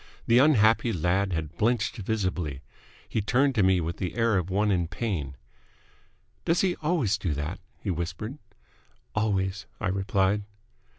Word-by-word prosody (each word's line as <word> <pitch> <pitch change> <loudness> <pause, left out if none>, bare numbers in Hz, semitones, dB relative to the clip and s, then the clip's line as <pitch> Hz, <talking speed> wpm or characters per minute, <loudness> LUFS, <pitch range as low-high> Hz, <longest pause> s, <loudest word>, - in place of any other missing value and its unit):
The 115 +1 +5
unhappy 115 -5 +4
lad 95 +2 +1
had 80 -1 -3
blenched 115 -1 +1
visibly. 95 -9 -2 0.4
He 110 - -1
turned 130 +7 +2
to 110 - +2
me 95 -1 +4
with 85 +1 -3
the 90 - -3
air 115 -2 +2
of 90 -1 0
one 105 +2 +2
in 90 -3 +1
pain. 85 - -3 1.1
"Does 165 +1 +2
he 185 -2 +1
always 150 - +1
do 85 -7 -1
that?" 75 +5 -4 0.2
he 100 - -3
whispered. 85 - -4 0.7
"Always," 95 -4 0
I - - -1
replied. 95 +1 +1
100 Hz, 145 wpm, -27 LUFS, 90-115 Hz, 1.1 s, The